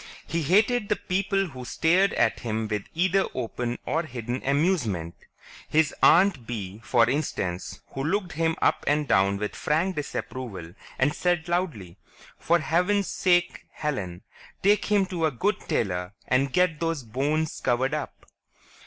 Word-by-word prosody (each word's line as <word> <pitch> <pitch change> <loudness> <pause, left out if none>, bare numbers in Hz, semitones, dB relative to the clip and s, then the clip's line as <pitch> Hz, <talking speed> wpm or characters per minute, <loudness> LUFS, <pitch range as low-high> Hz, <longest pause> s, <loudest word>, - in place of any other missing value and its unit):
He 170 - -2
hated 210 - +2
the 210 - +3
people 195 0 -1
who 130 -3 -9
stared 175 +9 +2
at 115 -2 +2
him 110 -1 -2
with 105 -2 -3
either 185 +3 +2
open 120 -1 -3
or 165 - 0
hidden 125 -5 -5
amusement. 140 - 0 0.6
His 155 -1 +3
Aunt 170 - +5
Bee, 105 -3 -5
for 120 -1 +3
instance, 100 - -2
who 135 - -5
looked 185 +3 -1
him 160 +1 0
up - - +2
and 150 0 +2
down 100 -3 +3
with 105 +1 -4
frank 170 +5 0
disapproval 120 - -5 0.2
and 140 +3 +2
said 175 -1 0
loudly, 155 - -2 0.4
"For 170 - +3
Heavens 180 +5 +1
sake, 175 -1 +1
Helen! 100 - -4 0.4
Take 205 +2 +4
him 205 -2 +3
to 175 -4 0
a - - -2
good 195 - 0
tailor 90 -1 -1
and 135 +1 +2
get 180 -1 +2
those 165 -4 -1
bones 145 +7 -1
covered 130 +3 +1
up!" 150 -2 -5
150 Hz, 150 wpm, -26 LUFS, 120-180 Hz, 0.6 s, Aunt